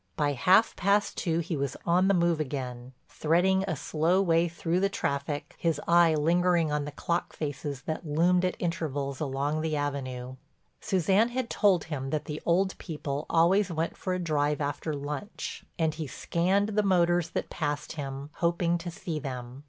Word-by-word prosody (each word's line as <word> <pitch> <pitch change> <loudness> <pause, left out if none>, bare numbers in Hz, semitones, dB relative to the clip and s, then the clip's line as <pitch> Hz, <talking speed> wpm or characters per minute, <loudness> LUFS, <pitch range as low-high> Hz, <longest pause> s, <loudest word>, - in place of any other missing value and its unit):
By 145 -1 +1
half 185 - +4
past 200 +2 +2
two 170 -2 0
he 170 0 -3
was 140 -2 -2
on 180 +2 +3
the 195 - +4
move 170 -2 +2
again, 130 -3 -4
threading 180 +4 +2
a 160 - -1
slow 160 +6 +1
way 170 -3 +3
through 170 +1 -1
the 195 +1 +2
traffic, 140 -5 -3
his 165 -3 +1
eye 170 -1 +5
lingering 170 +1 +2
on 150 -1 0
the 145 - -5
clock 170 +4 -2
faces 145 -2 -4
that 155 - -4
loomed 175 +4 +2
at 180 - 0
intervals 145 -6 -2
along 145 +1 -1
the 160 -1 -1
Avenue. 130 -3 -3 0.4
Suzanne 190 +5 +2
had 245 -1 -3
told 195 -5 +3
him 135 -4 -4
that 150 +1 -2
the 150 0 -5
old 190 +3 +2
people 150 -3 -4
always 180 +4 +3
went 165 0 -2
for 185 -1 -2
a - - -2
drive 150 -3 0
after 145 +2 -2
lunch 145 +8 -5
and 160 -2 +1
he 155 -1 -5
scanned 190 +9 0
the 210 0 +2
motors 175 -4 +2
that - - -4
passed 150 -2 -2
him, 140 -1 -6
hoping 170 0 +1
to 175 +1 -5
see 165 -2 -4
them. 125 -2 -6
160 Hz, 175 wpm, -28 LUFS, 145-180 Hz, 0.4 s, eye